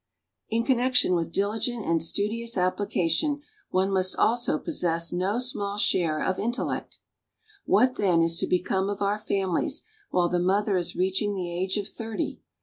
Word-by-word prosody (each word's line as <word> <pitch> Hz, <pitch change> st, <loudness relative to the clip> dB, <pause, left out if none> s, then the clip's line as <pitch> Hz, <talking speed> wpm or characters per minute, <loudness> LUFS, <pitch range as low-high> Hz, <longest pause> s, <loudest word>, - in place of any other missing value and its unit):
In 230 Hz, +1 st, +1 dB
connection 250 Hz, -5 st, +2 dB
with 165 Hz, -2 st, -1 dB
dihgent 220 Hz, +4 st, -1 dB
and 165 Hz, -1 st, +2 dB
studious 220 Hz, +7 st, 0 dB
ap])Hcation 185 Hz, -, 0 dB, 0.3 s
one 190 Hz, +1 st, +1 dB
must 185 Hz, -1 st, +2 dB
also 240 Hz, +2 st, +2 dB
possess 170 Hz, -, 0 dB
no 185 Hz, +5 st, 0 dB
small 205 Hz, -5 st, 0 dB
share 165 Hz, -6 st, +2 dB
of 185 Hz, -, -1 dB
in 230 Hz, -, 0 dB
tellect". 245 Hz, -, -4 dB, 0.7 s
What, 250 Hz, +7 st, +3 dB
then, 175 Hz, -4 st, +3 dB
is 165 Hz, 0 st, +2 dB
to -, -, +1 dB
become 190 Hz, +2 st, 0 dB
of 205 Hz, 0 st, -3 dB
our 205 Hz, +1 st, 0 dB
families 200 Hz, -, -1 dB, 0.3 s
while 175 Hz, -1 st, +2 dB
the 175 Hz, 0 st, 0 dB
mother 195 Hz, +3 st, +1 dB
is 175 Hz, -2 st, -1 dB
reach 190 Hz, +1 st, +1 dB
ing 205 Hz, -1 st, -1 dB
the 175 Hz, -2 st, -4 dB
age 185 Hz, +2 st, -1 dB
©f 200 Hz, -1 st, -2 dB
thirty? 225 Hz, -2 st, -4 dB
195 Hz, 165 wpm, -26 LUFS, 180-225 Hz, 0.7 s, What